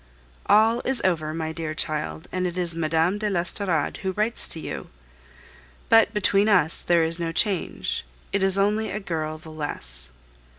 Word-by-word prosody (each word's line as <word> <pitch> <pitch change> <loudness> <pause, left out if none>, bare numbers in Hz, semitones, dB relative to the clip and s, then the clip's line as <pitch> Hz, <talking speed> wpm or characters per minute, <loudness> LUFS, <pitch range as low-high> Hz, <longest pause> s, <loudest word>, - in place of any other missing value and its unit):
All 225 +3 +4
is 265 -2 +2
over, 155 -4 +1
my 160 0 -3
dear 160 -1 -4
child, 155 +1 -3
and 185 0 -1
it 175 0 -5
is 175 -2 0
Mme. 165 +4 +1
de 210 0 -1
l'Estorade 175 -3 -1
who 190 -1 -3
writes 215 +4 +1
to 165 - -1
you. - - -6 1.0
But 225 -2 +6
between 205 0 +2
us 175 -6 +3
there 170 -1 +3
is 165 +1 -2
no 165 -1 -2
change; 195 +2 -1 0.3
it 200 - +1
is 190 0 +3
only 210 +2 +1
a 210 - -3
girl 155 -5 -3
the 155 0 -12
less. 65 - -2
175 Hz, 170 wpm, -24 LUFS, 160-205 Hz, 1.0 s, But